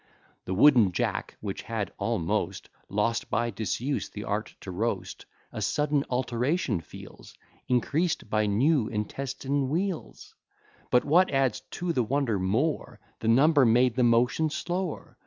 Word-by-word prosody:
The 95 - -2
wooden 115 -5 +6
jack, - - -2
which - - -4
had - - -4
almost 85 -1 -1 0.2
Lost 105 +3 0
by 120 +2 0
disuse 115 +6 -2
the 105 - -7
art 105 +1 -3
to 95 - -7
roast, 110 +6 -3 0.2
A 110 - -6
sudden 145 +6 +1
alteration 125 - 0
feels, - - -13 0.3
Increas'd 145 +5 0
by 110 0 +1
new 125 +4 +2
intestine 135 +5 -2
wheels; 175 +3 -3 0.6
But 125 - +3
what 175 +6 +4
adds 135 -4 +1
to 175 -1 -3
the 130 - +2
wonder 120 -3 0
more, 115 +12 -1 0.2
The 110 - -4
number 140 +5 +5
made 120 +1 +4
the 130 - +1
motion 125 +6 +3
slower. 175 +2 -4
125 Hz, 140 wpm, -27 LUFS, 110-145 Hz, 0.6 s, wooden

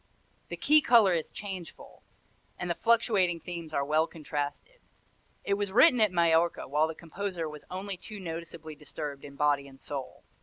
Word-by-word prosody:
The - - -6
key 305 +1 +5
color 230 -8 +6
is 165 -2 -1
changeful, 190 -5 -8 0.6
and 175 0 -3
the - - +2
fluctuating 205 -5 +2
themes 170 -2 -7
are 140 -2 0
well 155 +2 +2
contrasted. 155 - -5 0.6
It 200 - 0
was 200 -1 -1
written 250 - +6
at 215 -3 +4
Majorca 170 -1 +2
while 150 +3 +2
the 160 - -6
composer 175 0 -4
was 150 -1 -10
only 190 +1 -4
too 210 +3 -9
noticeably 165 -2 -7
disturbed 150 -1 -7
in 140 -1 -10
body 145 -1 +1
and 135 -1 -15
soul. 135 -3 -6
170 Hz, 165 wpm, -29 LUFS, 150-200 Hz, 0.6 s, color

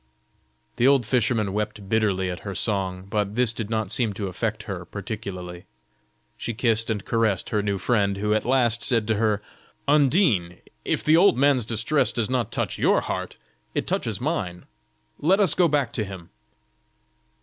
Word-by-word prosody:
The 120 - +4
old 135 -4 +4
fisherman 110 -3 +1
wept 105 -1 -3
bitterly 95 -4 +1
at 90 - -6
her 100 -2 -6
song, 95 -3 -2
but 105 0 -2
this 120 -2 +2
did 110 -2 -5
not 110 -3 -2
seem 120 -6 +1
to 100 -1 -4
affect 105 +3 -3
her 95 -5 -5
particularly. 95 -3 -7 0.7
She 115 - -4
kissed 115 -1 +2
and 105 -3 -2
caressed 110 -5 0
her 105 - +1
new 100 -1 -1
friend, 100 -1 +1
who 105 +1 0
at 110 - +1
last 120 -2 +1
said 115 -4 +1
to 110 - +2
her: 105 -2 +1 0.4
"Undine, 140 - +3 0.3
if - - 0
the 155 - +5
old 175 -8 +5
man's 135 -3 +3
distress 120 +6 +1
does 120 0 -2
not 120 -3 0
touch - - -2
your - - +3
heart, - - -4 0.4
it - - 0
touches 110 -4 -1
mine 115 - -3 0.5
let 185 +7 +3
us 190 -7 +5
go 175 - +3
back 140 -6 0
to 110 - 0
him." 95 -4 -9
110 Hz, 170 wpm, -24 LUFS, 100-125 Hz, 0.7 s, the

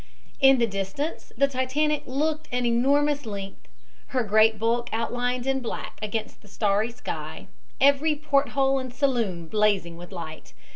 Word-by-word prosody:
In 270 -1 +7
the 235 - +3
distance 200 - -4
the 275 +2 +4
Titanic 275 +3 0
looked 305 +4 -1
an 245 0 0
enormous 280 +3 +2
length, 195 -2 -7 0.4
her 255 -2 0
great 220 +1 +4
bulk 235 +2 0
outlined 245 +2 -1
in 270 0 +1
black 240 -3 -6
against 215 +1 -4
the 210 - -18
starry 205 +2 +1
sky, 235 - -6 0.3
every 280 +3 +4
port 285 -2 +1
hole 270 0 +3
and 260 -1 -6
saloon 235 - 0
blazing 200 -4 +1
with 175 +2 -11
light. 155 - -8
245 Hz, 150 wpm, -25 LUFS, 210-275 Hz, 0.4 s, In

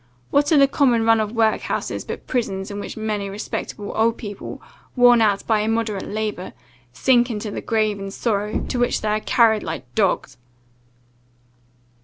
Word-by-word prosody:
What 290 +2 +2
are 310 - +6
the 275 -1 +6
common 245 -5 +2
run 225 0 +5
of 215 -1 -1
workhouses, 225 -2 0
but - - -7
prisons, 200 -5 -2
in 200 - -5
which 205 - -7
many 210 -2 -2
respectable 205 0 -5
old 230 +1 +2
people, 205 -2 -7 0.4
worn 245 -2 +6
out 205 -2 +2
by 220 -2 +2
immoderate 215 -2 -1
labour, 210 -3 -4 0.4
sink 240 - +3
into 210 -2 -4
the - - -5
grave 215 -2 0
in 195 0 -5
sorrow, 210 0 -2
to 250 - -3
which 245 - +1
they 215 - -1
are 210 0 +1
carried 220 -1 +3
like 145 -7 -6
dogs!" 185 - 0
215 Hz, 165 wpm, -22 LUFS, 205-230 Hz, 0.4 s, are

